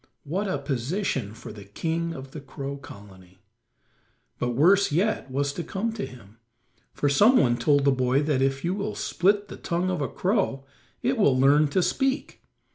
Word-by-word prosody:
What 185 +8 -2
a 185 - -1
position 135 - -2
for 115 - -10
the 105 -1 -10
king 165 - -3
of 135 -1 -9 0.2
Crow 140 0 -5
Colony. 95 -7 -14 1.0
But 120 -1 -1
worse 185 +7 +4
yet 190 0 0
was 140 +2 -1
to 170 - -4
come 220 +6 -3
to 215 -3 -4
him, 115 -3 -15 0.5
for 145 - -1
some 210 - +5
one 120 -2 +3
told 145 +2 +2
the 140 - +5
boy 130 +2 +1
that 145 -3 0
if 135 +3 0
you 175 - 0
will 205 +2 -3
split 200 +3 +1
the - - -9
tongue 175 +2 -1
of 180 -5 -2
a 140 - 0
crow 185 - -1 0.4
it 250 0 0
will 140 -11 +4
soon 130 - +1
learn 145 +3 +5
to 180 +6 +1
speak. 270 +6 -1
145 Hz, 185 wpm, -25 LUFS, 130-190 Hz, 1.0 s, some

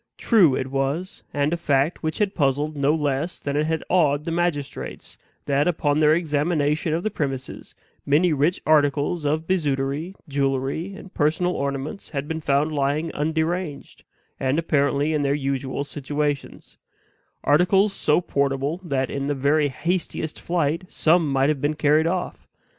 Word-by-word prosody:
True 185 - +4
it 130 0 -3
was, 140 +7 -2
and 145 +2 0
a - - 0
fact 145 -1 +1
which 155 -1 -2
had 205 -2 0
puzzled 145 +1 0
no 145 +2 +2
less 150 +2 -1
than 140 0 -3
it 150 +1 +1
had 160 -1 -1
awed 150 -5 +2
the 165 - -2
magistrates, 165 -5 -3 0.3
that, 145 +2 +2
upon 150 -4 +1
their 155 0 +5
examination 150 -1 0
of 170 - -2
the 215 - -1
premises, 135 -7 -5 0.3
many 155 +4 +3
rich 150 +5 +1
articles 150 +1 +2
of 155 +2 0
bijouterie, 150 0 -1
jewelry, 140 +6 -1
and 195 -2 -12
personal 160 +4 +1
ornaments, 140 +5 -4
had 140 -1 -4
been 160 0 -3
found 145 +1 +1
lying 150 +2 0
underanged, 160 +1 -2 0.4
and 135 +2 0
apparently 145 -2 +1
in 150 - +1
their 140 0 +1
usual 135 -1 -2
situations; 145 0 -4 0.6
articles 185 +7 +3
so 150 -3 +2
portable 140 +2 -1
that 135 -6 -1
in 140 0 -3
the 145 - 0
very 145 +2 +2
hastiest 165 +1 -3
flight 165 -1 0
some 160 -2 +2
might 135 +1 +2
have 150 -3 -1
been 150 +1 0
carried 155 +2 +3
off. 180 +1 -3
150 Hz, 155 wpm, -23 LUFS, 140-165 Hz, 0.6 s, their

